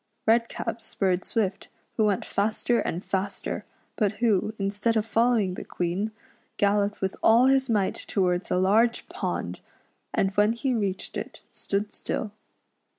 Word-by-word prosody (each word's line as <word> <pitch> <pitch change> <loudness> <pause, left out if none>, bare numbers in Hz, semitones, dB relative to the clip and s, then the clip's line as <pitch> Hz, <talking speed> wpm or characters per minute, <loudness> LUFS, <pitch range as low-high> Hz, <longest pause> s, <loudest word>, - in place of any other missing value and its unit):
Redcap 230 0 +1
spurred 190 -4 0
Swift, 205 -5 -1 0.3
who 220 - +3
went 205 -3 +1
faster 220 +3 +1
and 175 +3 -3
faster, 190 +1 -2 0.3
but 210 -4 +1
who, 215 -1 +1
instead 205 +3 0
of 215 - +1
following 225 -4 +2
tlie - - -7
Queen, 180 +5 -2 0.5
galloped 205 0 +1
with 190 0 -1
all 230 +3 +6
his 265 -1 +3
might 205 -4 +1
towards 180 -2 0
a - - +1
large 220 +6 +3
pond; - - -3 0.5
and 195 - +1
when 210 +3 +3
he 255 +2 -1
reached 200 -5 -2
it - - -7
stood 205 +1 -3
still. 215 - -3
210 Hz, 145 wpm, -26 LUFS, 195-225 Hz, 0.5 s, all